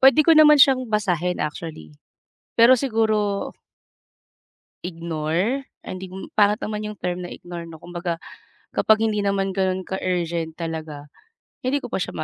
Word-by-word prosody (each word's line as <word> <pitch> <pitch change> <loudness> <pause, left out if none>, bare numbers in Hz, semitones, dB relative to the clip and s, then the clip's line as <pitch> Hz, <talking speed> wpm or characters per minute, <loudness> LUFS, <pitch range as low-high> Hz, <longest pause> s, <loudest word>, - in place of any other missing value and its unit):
puwede 270 +3 +7
ko 330 - +6
naman 305 -1 +8
siyang 260 -3 +5
basahin 180 -5 0
actually. 150 - -7 0.6
Pero 240 +3 +6
siguro 220 -5 0 1.3
ignore, 170 - -2 0.2
ay, - - -6
hindi, 185 0 -8 0.2
pangit 210 0 +4
naman 210 -2 -4
yung 210 - -10
term 180 0 -3
na 175 - -7
ignore, 175 -1 -8
'no, 160 - -10
kumbaga 175 0 -4 0.5
kapag 220 0 +3
hindi 215 -2 +1
naman 195 -1 0
gano'n 190 -1 0
ka-urgent 170 -4 -2
talaga, 160 -3 -5 0.6
hindi 280 +3 -1
ko - - -7
pa - - -1
siya - - -4
ma - - -3
190 Hz, 145 wpm, -23 LUFS, 170-220 Hz, 1.3 s, naman